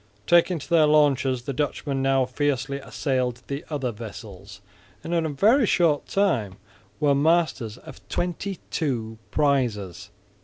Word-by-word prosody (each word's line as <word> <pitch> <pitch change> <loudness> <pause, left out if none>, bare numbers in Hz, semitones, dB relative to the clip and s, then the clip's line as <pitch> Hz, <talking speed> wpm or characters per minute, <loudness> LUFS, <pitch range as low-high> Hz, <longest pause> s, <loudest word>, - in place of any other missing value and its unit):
Taking 175 +1 +4
to 145 - -9
their 160 -3 +4
launches, 135 -4 +3
the 140 - -4
Dutchmen 140 -1 -2
now 135 -1 +2
fiercely 140 +1 -1
assailed 130 -3 -2
the 140 +2 -5
other 140 -5 -2
vessels, 105 -3 -10 0.4
and 170 - -4
in 165 -2 +1
a - - -3
very 215 - +3
short 160 -6 +2
time 130 - 0 0.4
were 145 -1 +3
masters 140 -7 +1
of - - -13
twenty 180 +2 -3
two 115 -7 -2
prizes. 105 - 0
140 Hz, 140 wpm, -24 LUFS, 120-155 Hz, 0.4 s, Taking